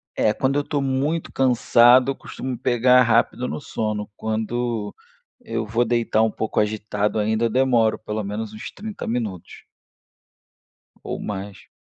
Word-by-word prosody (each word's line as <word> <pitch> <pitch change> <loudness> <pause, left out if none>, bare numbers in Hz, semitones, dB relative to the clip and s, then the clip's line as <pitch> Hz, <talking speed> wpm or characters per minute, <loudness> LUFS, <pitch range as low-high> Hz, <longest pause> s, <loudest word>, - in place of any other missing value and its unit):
É, 105 - +2
quando 135 +2 0
eu 145 - +2
estou 145 -1 -2
muito 140 +5 -1
cansado, 125 0 +5
eu - - -2
costumo 130 -2 -6
pegar 125 +1 +4
rápido 120 +2 +1
no - - -4
sono. 105 -3 -3
Quando 110 0 -3 0.5
eu 115 0 -3
vou 115 +3 +1
deitar 115 -2 +1
um 110 - +1
pouco 110 0 -1
agitado 105 0 -1
ainda, 110 +2 +1
eu - - +1
demoro 120 -3 +2
pelo 105 0 -4
menos 105 +2 -5
uns 110 - -8
30 215 0 -7
minutos 110 -7 -4 1.4
ou - - -4
mais. 100 -1 -7
115 Hz, 145 wpm, -22 LUFS, 110-125 Hz, 1.4 s, cansado